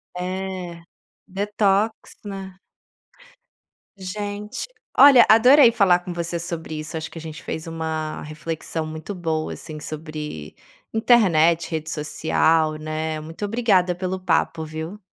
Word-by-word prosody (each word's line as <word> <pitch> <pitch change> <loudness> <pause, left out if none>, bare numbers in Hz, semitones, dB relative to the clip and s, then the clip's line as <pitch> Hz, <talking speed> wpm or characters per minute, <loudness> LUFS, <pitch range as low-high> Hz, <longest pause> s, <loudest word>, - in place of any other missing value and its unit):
É. 185 -1 -5 0.5
Detox, 205 +2 +1 0.3
né. 195 -2 -7 1.4
Gente! 205 - -5 0.3
Olha, 270 -4 +9
adorei 245 +3 +7
falar 190 -6 +4
com 180 0 -8
você 170 0 -3
sobre 165 -2 -5
isso, 155 +1 -5
acho 160 - -5
que - - -10
a - - -9
gente 160 0 -8
fez 160 +1 -5
uma 160 -1 -4
reflexão 155 +1 -5
muito 155 +5 -6
boa, 160 -3 -2
assim, 155 -2 -9
sobre 150 - -7 0.4
internet, 170 -9 +4
rede 160 -1 -3
social, 155 +1 +1
né. 155 0 -3
Muito 165 +6 -6
obrigada 200 -5 +2
pelo 185 +1 -3
papo, 165 -3 0
viu. 160 +6 -6
170 Hz, 125 wpm, -23 LUFS, 155-195 Hz, 1.4 s, Olha